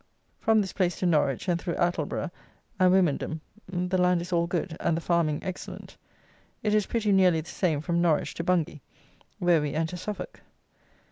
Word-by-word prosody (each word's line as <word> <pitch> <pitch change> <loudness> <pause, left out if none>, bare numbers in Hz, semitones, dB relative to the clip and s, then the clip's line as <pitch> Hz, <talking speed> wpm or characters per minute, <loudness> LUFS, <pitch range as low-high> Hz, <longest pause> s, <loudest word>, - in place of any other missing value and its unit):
From 220 -1 +3
this 190 - -4
place 180 -3 0
to - - -2
Norwich, 150 -5 +1
and 175 -2 +1
through 170 - -2
Attleborough 175 0 -1 0.5
and 185 -1 +5
Wymondham, 165 -3 +1 0.3
the 180 0 -1
land 180 -1 +3
is 175 +2 -5
all 170 0 +2
good, 175 -1 -2
and 165 - +1
the - - 0
farming 165 -3 0
excellent. 185 -1 -7 0.7
It 210 -1 +1
is 210 -2 +2
pretty 220 -3 0
nearly 185 -4 +4
the 160 - -12
same 160 -6 0
from 170 +1 0
Norwich 165 -3 +2
to 170 - -4
Bungay, 170 -4 0 0.6
where 175 -3 +3
we 145 -1 -3
enter 160 +3 -1
Suffolk. 210 +3 -6
175 Hz, 180 wpm, -27 LUFS, 165-185 Hz, 0.7 s, and